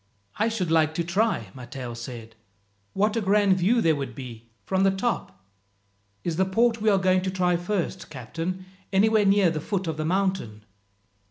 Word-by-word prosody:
"I 220 +2 +2
should 190 -7 -2
like 160 -1 +3
to 170 - 0
try," 175 - 0
Matteo 125 -1 -7
said. 115 -1 -8 0.6
"What 210 +3 +1
a 230 - +1
grand 200 -1 +3
view 225 +7 +3
there 160 -5 +3
would 135 -4 -5
be 115 -3 -9 0.2
from 190 0 0
the 195 - +5
top! 190 - -3 0.8
"Is 165 -2 -2
the 190 - +4
port 230 +4 +2
we 220 - +3
are 200 - +4
going 185 -1 +3
to 190 - -2
try 180 -1 +1
first, 180 0 -3
captain, 165 +7 -5 0.3
anywhere 210 +2 +4
near 195 -3 +4
the 155 -2 -3
foot 190 +2 -2
of 160 -2 -3
the 155 - -2
mountain?" 180 - -1
185 Hz, 180 wpm, -25 LUFS, 150-200 Hz, 0.8 s, the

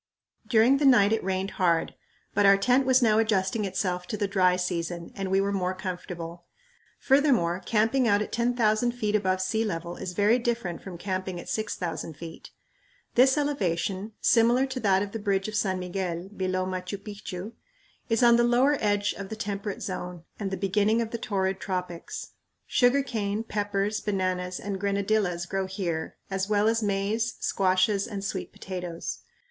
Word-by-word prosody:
During 240 +3 +5
the 290 - +1
night 215 -5 +6
it 225 - 0
rained 190 +1 -1
hard, 170 -2 +2 0.4
but - - +3
our 195 0 +7
tent 255 +6 +3
was 260 -1 +5
now 220 -1 +4
adjusting 210 -1 +1
itself 180 -2 -2
to 215 - -3
the 205 - 0
"dry 185 -2 +3
season" 175 -1 -3
and 195 -1 -4
we 190 +1 +3
were 200 +1 +1
more 185 -2 -1
comfortable. 175 -2 -6 0.5
Furthermore, 255 - +3
camping 230 +3 +2
out 205 -2 +4
at 210 - -3
10,000 235 -1 +2
feet 215 -3 -1
above 185 -2 +1
sea 220 +4 0
level 170 -4 -4
is 180 - -5
very 210 +5 +3
different 235 -8 -2
from 185 -3 -8
camping 185 0 -3
at - - -10
6000 175 -7 -3
feet. 165 0 -9 0.6
This 265 +3 +5
elevation, 200 - -1
similar 240 +3 +4
to 260 -1 -4
that 195 -4 +3
of 200 - -6
the 225 - -4
bridge 200 -1 0
of 215 - -5
San 195 -3 0
Miguel, 180 -1 -3
below 185 -2 -1
Machu 185 +1 -4
Picchu, 200 -1 -7 0.6
is 225 +2 +2
on 235 0 +7
the 240 - +4
lower 250 +5 +3
edge 205 -1 +1
of 195 -1 -7
the 220 - -4
temperate 205 -1 -4
zone 180 -2 -5 0.2
and 200 -2 -2
the 190 - -3
beginning 205 +4 +2
of 230 -1 -2
the 235 - -3
torrid 190 -3 -1
tropics. 180 -3 -5 0.3
Sugar 255 +3 +3
cane, 215 -4 -2
peppers, 205 -1 -1
bananas, 185 -2 -1
and 200 -1 -4
grenadillas 200 -3 0
grow 190 +1 -2
here 180 -4 -3
as 195 +1 -1
well 210 0 +3
as 225 0 +2
maize, 210 +3 0
squashes, 195 +1 +2
and 200 -3 -5
sweet - - -4
potatoes. 180 -3 -5
200 Hz, 175 wpm, -27 LUFS, 185-220 Hz, 0.6 s, our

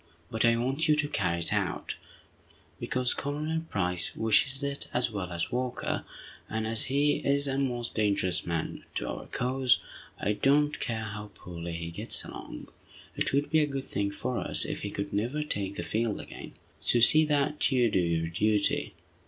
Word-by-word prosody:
But 110 +1 +2
I 115 0 +5
want 135 +7 +1
you 155 - +5
to 150 0 +1
carry 85 - 0
it - - 0
out, - - -1 0.9
because 125 -1 +1
Colonel 155 +3 -2
Price 90 -3 -1
wishes 125 +6 +2
it 140 0 -1
as 125 -1 +3
well 95 -4 -4
as 85 -1 -2
Walker, 125 0 -1 0.4
and 110 0 -1
as 110 0 +1
he 145 +2 +2
is 140 0 +1
a 135 0 0
most 120 -3 -1
dangerous 100 -4 +1
man 85 -2 -3
to - - -2
our - - -5
cause, 130 0 +2 0.4
I 105 - +1
don't 145 +6 +3
care 110 -2 -1
how 105 -1 -6
poorly 85 -1 -6
he 85 0 -4
gets 85 - 0
along. - - -8 0.5
It - - +1
would 140 +2 +1
be 160 - +5
a 150 - +3
good 135 -2 -3
thing 100 -5 -1
for 125 +5 -2
us - - -1
if - - -3
he 100 - -3
could 100 0 -4
never 120 +9 0
take 100 -9 -2
the - - -3
field 110 -1 -1
again. - - -9 0.3
So 120 - +3
see 155 +7 +7
that 150 0 +2
you 125 -4 +3
do 95 - +3
your 85 -2 +1
duty!" 105 +4 +1
115 Hz, 185 wpm, -29 LUFS, 100-140 Hz, 0.9 s, see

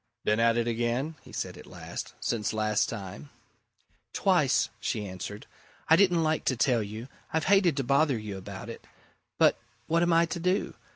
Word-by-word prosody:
"Been 105 +1 +2
at 115 0 +4
it 120 0 +1
again?" 120 +6 -1
he - - -15
said - - -5
at - - -13
last. - - -7
"Since 110 -2 -1
last 110 -1 +1
time?" 95 -10 -7 0.8
"Twice," - - +3
she 105 - -2
answered. 100 +2 -7 0.4
"I 160 - +8
didn't 175 -2 +4
like 155 0 +1
to 130 - +1
tell 120 -1 +3
you 110 +4 -6 0.2
I've 160 0 0
hated 190 -6 +4
to 135 - +1
bother 140 +1 +3
you 105 -2 -6
about 95 - -8
it. - - -9 0.5
But - - +4 0.3
what 165 +1 +2
am 175 0 +3
I 165 0 +5
to 170 +1 -4
do? 185 +4 0
120 Hz, 180 wpm, -28 LUFS, 110-160 Hz, 0.8 s, I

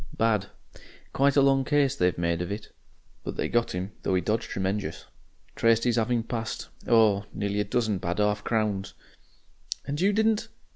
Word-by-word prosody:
Bad. 110 -3 +2 0.7
Quite 140 0 +3
a 140 - +6
long 135 -1 +4
case 140 -1 +2
they 90 -7 +3
made 85 0 0
of 90 - -3
it. 105 +1 -5 0.5
But - - -5
they - - 0
got 120 -5 0
'im, 95 +3 -3
though 95 - 0
he 90 - +2
dodged 110 +5 -1
tremenjous. 95 +2 -3 0.5
Traced 115 0 +3
'is 120 -2 +2
'aving 115 +1 +1
passed, 115 -1 -4 0.2
oh! 105 -3 +4
nearly 100 0 -1
a - - +2
dozen 110 -5 0
bad 85 +3 -2
'arf 105 0 +1
crowns." 105 -4 -1 0.9
"And 145 +3 -3
you 195 +2 +4
didn't 220 +1 +2
110 Hz, 175 wpm, -27 LUFS, 100-125 Hz, 0.9 s, a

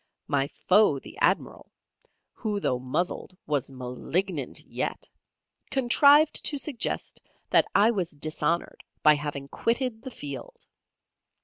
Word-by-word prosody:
My 140 -2 0
foe, 185 0 +3
the - - -11
Admiral, - - 0 0.6
who 210 -3 -3
though 125 -10 0
muzzled 175 +7 -3
was 145 -3 -1
malignant 135 +5 -2
yet, - - -4 0.6
contrived 280 +4 +5
to 290 - +2
suggest 275 -3 -3 0.3
that - - +5
I 210 +3 +6
was 185 -7 -2
dishonoured 155 +3 -2 0.2
by 150 - +8
having 145 -2 -4
quitted 230 - -1
the 260 - -7
field. 140 - -8
175 Hz, 115 wpm, -27 LUFS, 140-230 Hz, 0.6 s, by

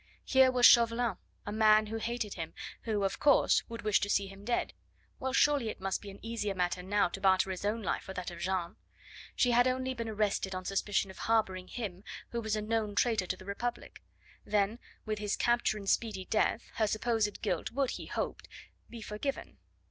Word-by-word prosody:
Here 265 -1 +5
was 250 -1 +4
Chauvelin, 235 0 +5 0.3
a 205 - -4
man 215 0 +5
who 220 +1 -4
hated 225 -2 -3
him, 165 -2 -6 0.3
who, 215 -3 0
of 195 0 -1
course, 285 -2 +4
would 230 0 -7
wish 210 -2 +3
to 200 - -2
see 200 -1 +2
him 195 +1 -11
dead. 235 +3 -1 0.5
Well, 265 - -2
surely 275 -3 +3
it - - -6
must 195 0 -2
be 205 - -9
an 195 - -10
easier 220 -3 -2
matter 180 0 -1
now 200 +2 +2
to 195 - -7
barter 190 -1 +3
his 185 - -5
own 215 +2 -1
life - - -1
for 190 - -8
that 180 0 -4
of 170 - -9
Jeanne; 180 -1 -2 0.6
she 245 - +3
had 245 +1 +5
only 260 0 -1
been 230 -2 -4
arrested 205 -3 -1
on 185 0 -5
suspicion 195 0 0
of - - -14
harbouring 190 -5 0
him, 195 -5 -6 0.3
who 235 - -3
was 220 -1 -1
a 215 - -2
known 215 -1 -1
traitor 220 -5 +2
to 185 - -2
the 185 - -13
Republic; 235 +5 -5 0.4
then, 210 +2 0 0.3
with 215 -1 -2
his 210 -1 -1
capture 240 -2 +1
and 200 -2 -8
speedy 200 -3 0
death, 220 +3 0
her 220 - +2
supposed 215 -1 0
guilt - - -1
would, 270 +1 0
he - - -6
hoped, - - -4 0.4
be 230 -2 -8
forgiven. 215 +7 -5
215 Hz, 205 wpm, -31 LUFS, 195-235 Hz, 0.6 s, Here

